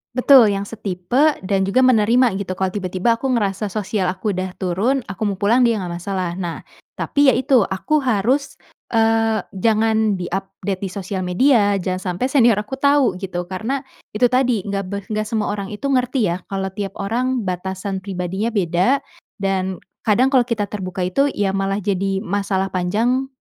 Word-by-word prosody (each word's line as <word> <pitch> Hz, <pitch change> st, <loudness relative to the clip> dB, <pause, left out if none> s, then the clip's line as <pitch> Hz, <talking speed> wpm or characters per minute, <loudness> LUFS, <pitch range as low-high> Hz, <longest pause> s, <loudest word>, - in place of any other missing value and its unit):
Betul, 255 Hz, -2 st, +7 dB
yang 195 Hz, -, -2 dB
setipe 220 Hz, -, 0 dB
dan 190 Hz, 0 st, 0 dB
juga 255 Hz, +6 st, +3 dB
menerima 235 Hz, -2 st, +3 dB
gitu. 185 Hz, -2 st, -4 dB
Kalo 190 Hz, 0 st, -1 dB
tiba-tiba 190 Hz, +4 st, 0 dB
aku 270 Hz, -, -2 dB
ngerasa 205 Hz, -1 st, -1 dB
sosial 200 Hz, -1 st, -2 dB
aku 185 Hz, +4 st, -2 dB
udah 185 Hz, -1 st, -4 dB
turun, 205 Hz, +9 st, 0 dB
aku 210 Hz, +3 st, -2 dB
mau 200 Hz, -, -1 dB
pulang, 210 Hz, +6 st, +2 dB
dia 230 Hz, -, +2 dB
nggak 185 Hz, -4 st, -4 dB
masalah. 185 Hz, -1 st, -3 dB
Nah, 175 Hz, -3 st, -4 dB, 0.3 s
tapi 285 Hz, 0 st, +1 dB
ya 265 Hz, -, +5 dB
itu 265 Hz, -1 st, +3 dB
aku 300 Hz, +11 st, 0 dB
harus, 255 Hz, +3 st, 0 dB, 0.4 s
eee, 225 Hz, -1 st, +2 dB
jangan 220 Hz, +1 st, +2 dB
di 180 Hz, -2 st, -5 dB
update 195 Hz, 0 st, -4 dB
di 195 Hz, -, -3 dB
sosial 190 Hz, 0 st, -5 dB
media, 205 Hz, +3 st, +3 dB
jangan 185 Hz, -1 st, -2 dB
sampai 255 Hz, +8 st, -1 dB
senior 240 Hz, -5 st, +5 dB
aku 210 Hz, +6 st, -5 dB
tahu, 280 Hz, -9 st, +3 dB
gitu. 180 Hz, -2 st, -4 dB
Karena 220 Hz, +10 st, -3 dB, 0.3 s
itu 245 Hz, +3 st, +3 dB
tadi, 250 Hz, -5 st, +2 dB
nggak 200 Hz, 0 st, -2 dB
be 200 Hz, +1 st, -4 dB
nggak 215 Hz, +1 st, -3 dB
semua 215 Hz, -2 st, -1 dB
orang 200 Hz, -1 st, -4 dB
itu 210 Hz, +5 st, -9 dB
ngerti 250 Hz, -5 st, +1 dB
ya, 175 Hz, -, -3 dB
kalo 195 Hz, -1 st, -3 dB
tiap 195 Hz, 0 st, -5 dB
orang 245 Hz, +4 st, -1 dB
batasan 190 Hz, +1 st, -3 dB
pribadinya 190 Hz, +4 st, -3 dB
beda, 190 Hz, -, +2 dB, 0.3 s
dan 190 Hz, -2 st, -2 dB, 0.2 s
kadang 250 Hz, +5 st, +3 dB
kalau 250 Hz, -3 st, +3 dB
kita 225 Hz, -4 st, -1 dB
terbuka 190 Hz, -3 st, -4 dB
itu 185 Hz, +11 st, +2 dB
ya 205 Hz, -8 st, -1 dB
malah 195 Hz, 0 st, -1 dB
jadi 195 Hz, 0 st, -1 dB
masalah 195 Hz, -1 st, -1 dB
panjang 225 Hz, +9 st, 0 dB
200 Hz, 175 wpm, -20 LUFS, 190-235 Hz, 0.4 s, Betul